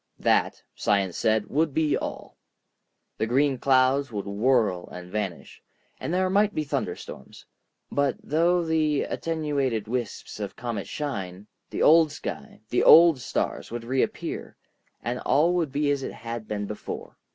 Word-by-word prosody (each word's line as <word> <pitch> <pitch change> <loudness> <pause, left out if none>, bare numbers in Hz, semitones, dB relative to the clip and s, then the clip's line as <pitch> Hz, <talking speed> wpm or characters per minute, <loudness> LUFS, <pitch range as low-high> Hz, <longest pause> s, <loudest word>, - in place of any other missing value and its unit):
That, - - +1
science 100 -3 0
said, 110 -1 +1
would 150 -1 0
be 155 -2 +2
all. - - -6 0.8
The 110 - 0
green 135 +2 +2
clouds 135 0 +3
would 105 -2 -4
whirl 105 -3 +1
and 90 0 -9
vanish, 100 -4 -5 0.4
and - - -4
there 185 +1 +2
might 205 +2 +2
be 155 - 0
thunderstorms. 145 - -5 0.5
But 140 -2 +1
through 170 +3 +2
the 155 -3 +1
attenuated 140 -9 -2
wisps 120 -2 -4
of 100 -2 -5
comet 115 -4 -4
shine, 100 -10 -5 0.2
the - - -1
old 160 -1 +6
sky, - - -7
the - - +2
old 165 -4 +8
stars, 120 - -3
would 120 0 -5
reappear, 130 +3 -2 0.5
and 125 +1 -2
all 150 +7 +3
would 165 -6 0
be 145 +1 +1
as 140 -1 0
it - - -5
had 115 -1 -6
been 105 -1 -3
before. 105 +1 -7
130 Hz, 150 wpm, -26 LUFS, 110-155 Hz, 0.8 s, old